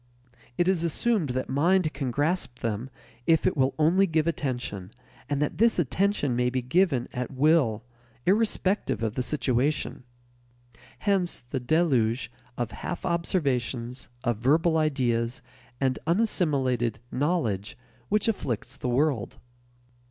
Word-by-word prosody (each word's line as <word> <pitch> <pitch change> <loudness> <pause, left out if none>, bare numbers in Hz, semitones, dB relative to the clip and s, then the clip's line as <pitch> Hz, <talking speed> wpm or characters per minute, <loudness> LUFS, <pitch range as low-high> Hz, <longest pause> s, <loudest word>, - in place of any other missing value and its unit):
It 175 - +2
is 185 -3 +2
assumed 175 - +1
that 130 +1 -2
"mind" 160 +5 +2
can 135 -2 -3
grasp 145 -1 -1
them 115 +2 -2 0.4
if 160 -1 +4
it 185 - +2
will 135 -2 +1
only 175 +6 +4
give 160 -2 +1
attention, 125 - -3 0.4
and 145 -1 0
that 150 +3 -3
this 230 0 +4
attention 175 -3 +1
may 125 0 +2
be 130 0 -2
given 140 -2 +2
at 125 0 -3
will 135 -6 +2 0.4
irrespective 200 - +1
of 110 -2 -1
the 130 - -1
situation. 135 +1 0 1.0
Hence 195 -4 0
the 125 +2 -4
deluge 125 -5 +1 0.3
of 120 -2 -2
half 175 - -5
observations, 130 -8 -1
of 120 -4 0
verbal 160 +7 +3
ideas, 125 -6 0 0.4
and 130 -1 0
unassimilated 140 - +1
"knowledge" 125 - -1 0.3
which 210 +1 +2
afflicts 130 - -2
the 125 - -3
world. 130 -3 0
140 Hz, 130 wpm, -27 LUFS, 125-170 Hz, 1.0 s, if